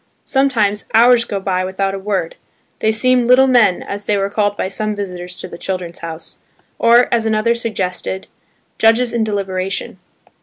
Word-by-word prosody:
Sometimes, 230 Hz, -7 st, +1 dB
hours 235 Hz, +1 st, +5 dB
go 205 Hz, -4 st, -3 dB
by 185 Hz, -1 st, -1 dB
without 195 Hz, +1 st, -2 dB
a 195 Hz, -, -4 dB
word. 190 Hz, -4 st, -2 dB, 0.4 s
They 220 Hz, -, +2 dB
seem 245 Hz, +2 st, +2 dB
"little 255 Hz, +2 st, +6 dB
men," 240 Hz, -8 st, +3 dB
as 205 Hz, 0 st, -5 dB
they 210 Hz, -, +2 dB
were 195 Hz, 0 st, -1 dB
called 205 Hz, -1 st, 0 dB
by -, -, -1 dB
some 215 Hz, +2 st, -3 dB
visitors 180 Hz, -3 st, -6 dB
to -, -, -7 dB
the 170 Hz, -, -11 dB
"Children's 180 Hz, -2 st, -4 dB
House"; 165 Hz, -1 st, -5 dB, 0.4 s
or, 235 Hz, +1 st, +5 dB
as 225 Hz, -1 st, +1 dB
another 220 Hz, +1 st, +2 dB
suggested, 190 Hz, -5 st, -3 dB, 0.5 s
"judges 230 Hz, +2 st, +3 dB
in 235 Hz, -2 st, +1 dB
deliberation." 195 Hz, -3 st, -3 dB
205 Hz, 165 wpm, -17 LUFS, 190-230 Hz, 0.5 s, little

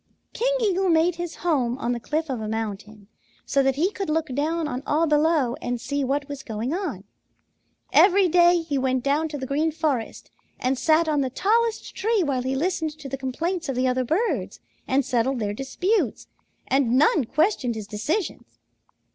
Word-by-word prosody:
"King -, -, +1 dB
Eagle 385 Hz, -3 st, +1 dB
made 330 Hz, +1 st, +3 dB
his 345 Hz, -1 st, -5 dB
home 260 Hz, -7 st, +1 dB
on 240 Hz, -3 st, -2 dB
the 240 Hz, -, -2 dB
cliff 310 Hz, +6 st, -2 dB
of 255 Hz, -5 st, -3 dB
a 215 Hz, -, -4 dB
mountain, 210 Hz, -1 st, -5 dB, 0.4 s
so 275 Hz, -, +2 dB
that 270 Hz, -1 st, +2 dB
he 345 Hz, +8 st, +1 dB
could 390 Hz, -5 st, -4 dB
look 310 Hz, -3 st, -1 dB
down 315 Hz, +4 st, -1 dB
on 255 Hz, -3 st, -4 dB
all 315 Hz, +3 st, +2 dB
below 300 Hz, -4 st, +2 dB
and 245 Hz, 0 st, -2 dB
see 285 Hz, +4 st, -2 dB
what 280 Hz, +2 st, -1 dB
was 285 Hz, -2 st, -6 dB
going 225 Hz, +4 st, -4 dB
on. 335 Hz, -, -3 dB, 0.9 s
Every 390 Hz, 0 st, +6 dB
day 345 Hz, 0 st, +5 dB
he 290 Hz, -4 st, -1 dB
went 260 Hz, -1 st, 0 dB
down 290 Hz, +3 st, +1 dB
to 300 Hz, -2 st, -5 dB
the 265 Hz, -, -5 dB
Green 300 Hz, +4 st, 0 dB
Forest 295 Hz, -7 st, -3 dB, 0.3 s
and 255 Hz, +2 st, +1 dB
sat 315 Hz, +4 st, +3 dB
on 300 Hz, -2 st, +1 dB
the 265 Hz, -, -1 dB
tallest 445 Hz, -, 0 dB
tree 435 Hz, -1 st, +1 dB
while 275 Hz, -5 st, 0 dB
he 260 Hz, +1 st, -2 dB
listened 315 Hz, 0 st, -1 dB
to 280 Hz, -, -9 dB
the 270 Hz, -, -3 dB
complaints 320 Hz, +6 st, -3 dB
of 270 Hz, -, -1 dB
the 255 Hz, +1 st, +1 dB
other 255 Hz, 0 st, +1 dB
birds 345 Hz, -, -1 dB, 0.3 s
and 265 Hz, 0 st, +2 dB
settled 260 Hz, +1 st, 0 dB
their 205 Hz, -3 st, -2 dB
disputes, 355 Hz, -, -1 dB, 0.4 s
and 255 Hz, -2 st, +2 dB
none 300 Hz, -1 st, +4 dB
questioned 290 Hz, -, +1 dB
his 215 Hz, -2 st, -5 dB
decisions. 285 Hz, -, -3 dB
285 Hz, 190 wpm, -24 LUFS, 255-335 Hz, 0.9 s, Every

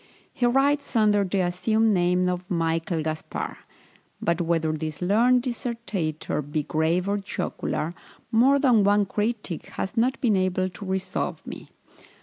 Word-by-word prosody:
He 245 Hz, -, +1 dB
writes 280 Hz, +2 st, +1 dB
under 210 Hz, -2 st, +4 dB
the 195 Hz, 0 st, 0 dB
assumed 215 Hz, +5 st, +2 dB
name 180 Hz, 0 st, +2 dB
of 180 Hz, +1 st, -3 dB
Michael 165 Hz, -2 st, 0 dB
Gaspar; 155 Hz, 0 st, -4 dB, 0.6 s
but 170 Hz, +1 st, 0 dB
whether 165 Hz, -2 st, +1 dB
this 155 Hz, -1 st, -4 dB
learned 235 Hz, +7 st, +3 dB
dissertator 230 Hz, -, -3 dB
be 150 Hz, +1 st, -3 dB
grave 160 Hz, +5 st, 0 dB
or 205 Hz, +1 st, 0 dB
jocular, 170 Hz, -4 st, -3 dB, 0.4 s
more 255 Hz, +5 st, +5 dB
than 250 Hz, -7 st, +4 dB
one 205 Hz, +1 st, +4 dB
critic 210 Hz, -3 st, -3 dB
has 195 Hz, -, -3 dB
not 250 Hz, +3 st, +1 dB
been 225 Hz, -5 st, +2 dB
able 185 Hz, 0 st, +1 dB
to 195 Hz, +3 st, -10 dB
resolve 190 Hz, 0 st, -3 dB
me. -, -, -9 dB
190 Hz, 140 wpm, -25 LUFS, 170-225 Hz, 0.6 s, more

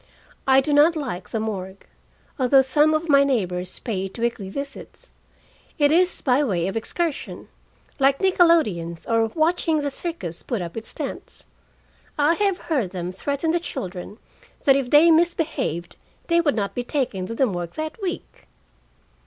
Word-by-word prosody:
I 265 Hz, 0 st, +6 dB
do 290 Hz, +2 st, -1 dB
not 300 Hz, +4 st, +5 dB
like 250 Hz, -, -5 dB
the 225 Hz, -, -2 dB
morgue, 195 Hz, -3 st, -5 dB, 0.5 s
although 265 Hz, +1 st, +5 dB
some 300 Hz, +4 st, +3 dB
of 315 Hz, +2 st, -2 dB
my 280 Hz, -2 st, +6 dB
neighbors 185 Hz, -9 st, -1 dB
pay 195 Hz, -5 st, -3 dB
it 195 Hz, -, -8 dB
weekly 230 Hz, -4 st, -2 dB
visits. 280 Hz, -, -8 dB, 0.6 s
It 290 Hz, -1 st, +4 dB
is 360 Hz, +3 st, +2 dB
by 265 Hz, +2 st, +2 dB
way 180 Hz, -10 st, 0 dB
of 195 Hz, -, -4 dB
excursion, 315 Hz, +7 st, -3 dB, 0.5 s
like 275 Hz, 0 st, +4 dB
nickelodeons 315 Hz, -, +2 dB
or 225 Hz, -1 st, +2 dB
watching 320 Hz, -1 st, +1 dB
the 285 Hz, -1 st, -2 dB
circus 265 Hz, -, -6 dB
put 240 Hz, -5 st, -3 dB
up 170 Hz, -2 st, -6 dB
its 225 Hz, 0 st, -7 dB
tents. -, -, -6 dB, 0.7 s
I 295 Hz, +2 st, +4 dB
have 395 Hz, +1 st, +1 dB
heard 270 Hz, -, -1 dB
them 180 Hz, -1 st, -5 dB
threaten 280 Hz, -, -2 dB
the 345 Hz, -, +1 dB
children 185 Hz, -, -6 dB, 0.5 s
that 275 Hz, -, +5 dB
if 270 Hz, -3 st, -1 dB
they 310 Hz, +4 st, +6 dB
misbehaved 315 Hz, -, 0 dB, 0.3 s
they 340 Hz, 0 st, +4 dB
would 295 Hz, -4 st, +1 dB
not 200 Hz, -3 st, -2 dB
be 245 Hz, -, -2 dB
taken 245 Hz, -8 st, -2 dB
to 230 Hz, -, -5 dB
the 265 Hz, -, +3 dB
morgue 175 Hz, -6 st, -4 dB
that 315 Hz, +7 st, -5 dB
week! 365 Hz, -3 st, -6 dB
270 Hz, 160 wpm, -23 LUFS, 195-315 Hz, 0.7 s, I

